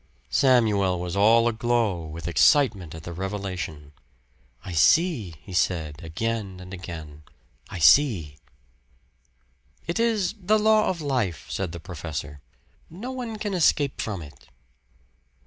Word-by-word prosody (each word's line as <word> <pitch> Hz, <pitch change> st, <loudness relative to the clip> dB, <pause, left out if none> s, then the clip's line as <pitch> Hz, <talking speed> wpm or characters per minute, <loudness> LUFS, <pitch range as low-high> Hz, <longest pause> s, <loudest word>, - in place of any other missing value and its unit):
Samuel 105 Hz, -8 st, +3 dB
was 90 Hz, 0 st, -4 dB
all 115 Hz, +4 st, +5 dB
aglow 110 Hz, -7 st, 0 dB
with 80 Hz, +2 st, -7 dB
excitement 95 Hz, -, +3 dB
at 80 Hz, -, -10 dB
the 85 Hz, -, -7 dB
revelation. 90 Hz, -6 st, -5 dB, 0.7 s
"I 90 Hz, -, -6 dB
see," 110 Hz, -, +3 dB
he 95 Hz, -, -10 dB
said, 80 Hz, -4 st, -1 dB
again 100 Hz, +3 st, -3 dB
and 90 Hz, +1 st, -10 dB
again 80 Hz, -5 st, -8 dB, 0.5 s
"I -, -, -6 dB
see!" 85 Hz, -, +4 dB, 1.5 s
"It 170 Hz, +6 st, -2 dB
is 220 Hz, -5 st, +1 dB
the 210 Hz, +4 st, +3 dB
law 215 Hz, 0 st, +3 dB
of 175 Hz, -3 st, -3 dB
life," 125 Hz, -, -1 dB
said 95 Hz, -4 st, -3 dB
the 85 Hz, -, -7 dB
professor. 75 Hz, -4 st, -7 dB, 0.5 s
"No 205 Hz, +11 st, -7 dB
one 245 Hz, -4 st, -5 dB
can 210 Hz, -1 st, -3 dB
escape 155 Hz, -5 st, +2 dB
from 100 Hz, -6 st, -4 dB
it." 75 Hz, -3 st, -15 dB
95 Hz, 130 wpm, -25 LUFS, 85-140 Hz, 1.5 s, all